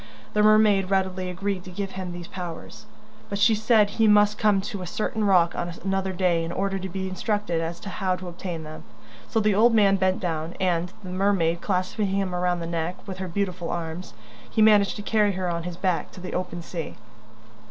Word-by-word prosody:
The 210 Hz, -, +3 dB
mermaid 210 Hz, -3 st, +5 dB
readily 190 Hz, -1 st, 0 dB
agreed 185 Hz, +1 st, -3 dB
to -, -, -8 dB
give 195 Hz, +1 st, -4 dB
him 185 Hz, -2 st, -5 dB
these 175 Hz, 0 st, -7 dB
powers, 180 Hz, +4 st, -8 dB, 0.4 s
but 200 Hz, -, -2 dB
she 215 Hz, +3 st, +5 dB
said 215 Hz, 0 st, +4 dB
he 220 Hz, +2 st, +2 dB
must 210 Hz, 0 st, +4 dB
come 210 Hz, -3 st, +4 dB
to 205 Hz, -1 st, -5 dB
a 180 Hz, -, -5 dB
certain 215 Hz, +3 st, -2 dB
rock 180 Hz, -4 st, +4 dB
on 175 Hz, 0 st, -3 dB
another 195 Hz, 0 st, 0 dB
day 180 Hz, -2 st, +1 dB
in 165 Hz, -, -4 dB
order 195 Hz, +1 st, -1 dB
to 190 Hz, 0 st, -5 dB
be 190 Hz, +1 st, -3 dB
instructed 190 Hz, -2 st, -1 dB
as 165 Hz, +1 st, -4 dB
to 205 Hz, -, -6 dB
how 185 Hz, -1 st, -1 dB
to 180 Hz, 0 st, -8 dB
obtain 175 Hz, -1 st, -5 dB
them. 155 Hz, 0 st, -9 dB, 0.4 s
So 225 Hz, -, 0 dB
the 210 Hz, -1 st, +2 dB
old 230 Hz, +3 st, +5 dB
man 200 Hz, -2 st, +5 dB
bent 190 Hz, 0 st, +1 dB
down 165 Hz, -2 st, -3 dB
and, 180 Hz, -2 st, 0 dB
the 185 Hz, -, -7 dB
mermaid 180 Hz, -3 st, +1 dB
clasping 190 Hz, +2 st, -1 dB
him 195 Hz, -1 st, -1 dB
round 180 Hz, -1 st, 0 dB
the -, -, -3 dB
neck 170 Hz, +1 st, -2 dB
with 190 Hz, -1 st, -6 dB
her 190 Hz, -, -3 dB
beautiful 180 Hz, -2 st, -2 dB
arms, 165 Hz, -5 st, -5 dB, 0.3 s
he -, -, -3 dB
managed 210 Hz, -2 st, +5 dB
to 205 Hz, -, -6 dB
carry 210 Hz, -2 st, +2 dB
her 185 Hz, 0 st, -2 dB
on 170 Hz, -1 st, -2 dB
his 175 Hz, -, -9 dB
back 185 Hz, -2 st, 0 dB
to -, -, -10 dB
the 180 Hz, -, -6 dB
open 180 Hz, -1 st, -3 dB
sea. 165 Hz, -1 st, -6 dB
185 Hz, 215 wpm, -25 LUFS, 175-205 Hz, 0.4 s, mermaid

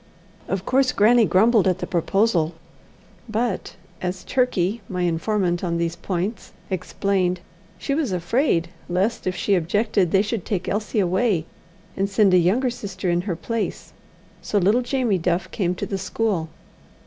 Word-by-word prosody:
Of 190 Hz, -1 st, -2 dB
course 260 Hz, 0 st, +3 dB
grannie 225 Hz, +1 st, +5 dB
grumbled 215 Hz, +1 st, +4 dB
at 185 Hz, -1 st, +2 dB
the -, -, -4 dB
proposal, 175 Hz, -2 st, +1 dB, 0.7 s
but, 225 Hz, -1 st, -2 dB, 0.3 s
as 180 Hz, 0 st, -3 dB
Turkey, 235 Hz, -5 st, 0 dB
my 180 Hz, -1 st, -2 dB
informant 175 Hz, +1 st, 0 dB
on 170 Hz, -2 st, 0 dB
these 170 Hz, 0 st, -1 dB
points, 190 Hz, +3 st, -4 dB, 0.2 s
explained, 185 Hz, 0 st, 0 dB, 0.4 s
she 275 Hz, -, -2 dB
was 285 Hz, -6 st, 0 dB
afraid 175 Hz, -, +1 dB, 0.2 s
lest, 190 Hz, +5 st, 0 dB
if 185 Hz, -, 0 dB
she 200 Hz, -, 0 dB
objected, 195 Hz, +2 st, +1 dB
they 195 Hz, +3 st, +3 dB
should 215 Hz, -3 st, -3 dB
take 185 Hz, -4 st, -3 dB
Elsie 210 Hz, +1 st, -1 dB
away 185 Hz, -2 st, +1 dB, 0.5 s
and 195 Hz, +1 st, 0 dB
send 200 Hz, -1 st, +4 dB
a 180 Hz, -, +7 dB
younger 230 Hz, +9 st, +2 dB
sister 195 Hz, -6 st, -3 dB
in 175 Hz, 0 st, +1 dB
her 175 Hz, -, 0 dB
place. 225 Hz, +6 st, -4 dB, 0.5 s
So 210 Hz, -, -1 dB
little 205 Hz, +6 st, +3 dB
Jamie 245 Hz, -6 st, 0 dB
Duff 175 Hz, +2 st, -1 dB
came 180 Hz, -3 st, -1 dB
to -, -, -3 dB
the 195 Hz, -, -3 dB
school. 190 Hz, -3 st, -1 dB
190 Hz, 155 wpm, -23 LUFS, 180-220 Hz, 0.7 s, a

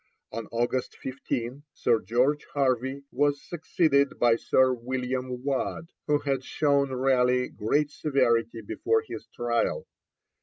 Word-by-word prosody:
On 115 Hz, -1 st, -5 dB
August 120 Hz, +2 st, -2 dB
15, 130 Hz, 0 st, -4 dB
Sir 115 Hz, -, +2 dB
George 130 Hz, +7 st, +1 dB
Harvey 130 Hz, 0 st, 0 dB
was 145 Hz, +2 st, +1 dB
succeeded 155 Hz, -3 st, +1 dB
by 120 Hz, -1 st, +4 dB
Sir 130 Hz, +2 st, +3 dB
William 125 Hz, +1 st, -3 dB
Waad, 140 Hz, +4 st, -2 dB, 0.2 s
who 150 Hz, -1 st, +4 dB
had 135 Hz, -2 st, -2 dB
shown 140 Hz, -1 st, +1 dB
Raleigh 125 Hz, -1 st, +2 dB
great 145 Hz, +8 st, 0 dB
severity 115 Hz, -7 st, +1 dB
before 440 Hz, -, 0 dB
his -, -, -7 dB
trial. 120 Hz, -1 st, -1 dB
130 Hz, 120 wpm, -27 LUFS, 120-140 Hz, 0.2 s, by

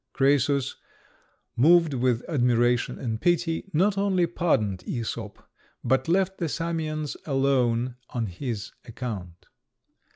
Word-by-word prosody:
Crœsus, 140 Hz, -1 st, +2 dB, 0.8 s
moved 165 Hz, +4 st, +5 dB
with 125 Hz, -2 st, +1 dB
admiration 120 Hz, -4 st, +2 dB
and 110 Hz, -3 st, -3 dB
pity, 175 Hz, +1 st, 0 dB
not 195 Hz, +5 st, +2 dB
only 190 Hz, -3 st, +2 dB
pardoned 130 Hz, -, 0 dB
Æsop, 115 Hz, -3 st, -4 dB, 0.5 s
but 130 Hz, +2 st, +1 dB
left 190 Hz, +2 st, +1 dB
the 170 Hz, -3 st, -1 dB
Samians 155 Hz, -2 st, -3 dB
alone 130 Hz, -3 st, +1 dB
on 120 Hz, -2 st, -2 dB
his 110 Hz, +3 st, -5 dB
account. 105 Hz, -8 st, -7 dB
135 Hz, 105 wpm, -26 LUFS, 120-165 Hz, 0.8 s, moved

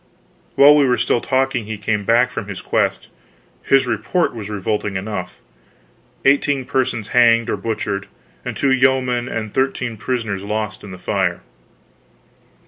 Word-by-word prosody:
While 145 Hz, +2 st, +8 dB
we 145 Hz, -2 st, +4 dB
were 125 Hz, -1 st, +2 dB
still 120 Hz, +1 st, +1 dB
talking 130 Hz, -3 st, 0 dB
he 110 Hz, 0 st, -5 dB
came 105 Hz, 0 st, -2 dB
back 120 Hz, +3 st, +3 dB
from 100 Hz, -, -5 dB
his 100 Hz, -2 st, -6 dB
quest. -, -, -1 dB, 0.5 s
His 135 Hz, -1 st, +3 dB
report 120 Hz, -, 0 dB
was 110 Hz, -3 st, -7 dB
revolting 105 Hz, 0 st, -2 dB
enough. 95 Hz, -2 st, -4 dB, 0.9 s
Eighteen 140 Hz, -1 st, +2 dB
persons 125 Hz, -5 st, -1 dB
hanged 115 Hz, -2 st, +4 dB
or -, -, +1 dB
butchered, 100 Hz, -1 st, -3 dB, 0.4 s
and -, -, -5 dB
two 140 Hz, -, +2 dB
yeomen 130 Hz, -2 st, +2 dB
and 110 Hz, -2 st, -4 dB
thirteen 130 Hz, -3 st, -1 dB
prisoners 110 Hz, -3 st, -3 dB
lost 105 Hz, 0 st, -4 dB
in 100 Hz, -, -9 dB
the 90 Hz, -, -8 dB
fire. 90 Hz, -, -1 dB
115 Hz, 145 wpm, -19 LUFS, 105-130 Hz, 0.9 s, While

